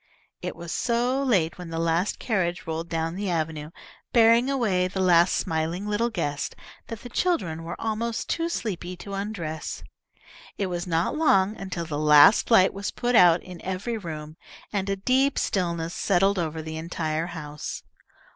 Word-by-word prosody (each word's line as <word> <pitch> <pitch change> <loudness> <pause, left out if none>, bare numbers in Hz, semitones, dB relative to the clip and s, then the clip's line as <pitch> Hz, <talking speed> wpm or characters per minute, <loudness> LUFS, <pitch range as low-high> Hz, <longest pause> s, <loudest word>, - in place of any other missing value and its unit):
It - - -4
was 170 0 -7
so 245 +3 0
late 185 -12 +1
when 175 -2 -7
the 165 - -4
last 165 +3 0
carriage 180 -7 -1
rolled 165 +1 -4
down 165 0 -1
the 195 +1 -3
avenue, 155 -3 -2 0.4
bearing 235 +1 +5
away 210 -9 +1
the 190 +1 -5
last 175 -1 +4
smiling 165 +2 -2
little 210 +3 0
guest, 150 -9 -3 0.3
that 230 - -7
the - - -8
children 235 - 0
were 165 - -6
almost 225 +1 -2
too 335 0 -1
sleepy 185 - -4
to 200 +2 -8
undress. 190 -6 -4 0.7
It 200 - 0
was 175 +1 -3
not 165 0 0
long 210 -10 +3
until 185 -4 -5
the 150 -2 -3
last 150 +5 +6
light 195 -5 +5
was 200 0 -3
put 245 0 -2
out 175 -4 +6
in 180 -2 -10
every 190 +6 -3
room, 155 -6 -7 0.4
and 200 -1 -1
a 195 - +1
deep 260 +7 +2
stillness 170 -3 -1
settled 195 0 +2
over 160 -1 -3
the 160 0 -6
entire 160 0 -2
house. 150 -4 -6
180 Hz, 165 wpm, -25 LUFS, 165-215 Hz, 0.7 s, last